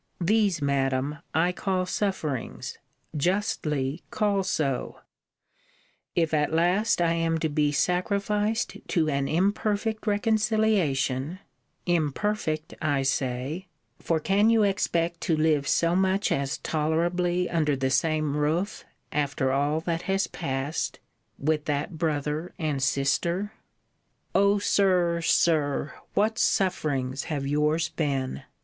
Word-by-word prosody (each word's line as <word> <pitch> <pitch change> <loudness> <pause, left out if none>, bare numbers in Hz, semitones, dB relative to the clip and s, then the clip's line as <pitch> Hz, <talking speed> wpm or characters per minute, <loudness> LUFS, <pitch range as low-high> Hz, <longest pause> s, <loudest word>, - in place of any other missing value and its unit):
These, 195 -3 +2
Madam, 140 +1 0 0.2
I 170 +3 +3
call 185 0 -1
sufferings: 180 - -3 0.4
justly 150 -4 -1
call 205 -2 +1
so; 150 -8 -2 1.1
if 165 -2 +1
at 150 -1 +2
last 180 +7 +2
I 170 -1 +3
am 165 -1 +1
to 160 0 -1
be 150 0 +1
sacrificed 200 +7 0
to 160 -5 +1
an 140 -1 0
imperfect 215 +4 0
reconciliation 205 - +1 0.5
imperfect, 160 0 -1
I 145 -3 +1
say: 135 +6 -2 0.3
for, 165 -1 0
can 200 +7 +3
you 225 -2 +4
expect 170 -4 0
to 160 - +1
live 155 -3 +2
so 170 +1 +2
much 190 +2 +1
as 140 0 0
tolerably 175 +3 0
under 155 -4 +1
the 130 0 -1
same 155 +1 +1
roof, 160 +7 -1 0.3
after 145 -2 0
all 145 +3 +1
that 165 0 -2
has 195 0 +2
passed, 135 -1 -3 0.4
with 150 +1 0
that 150 +2 -2
brother 150 +1 -2
and 150 -4 -1
sister? 170 +9 0 0.8
O 200 +1 +4
Sir, 180 -4 +2
Sir! 155 -4 +2 0.2
What 220 +2 +2
sufferings 140 -8 0
have 145 -4 -3
yours 150 +3 +1
been! 140 -5 -2
165 Hz, 115 wpm, -26 LUFS, 145-190 Hz, 1.1 s, you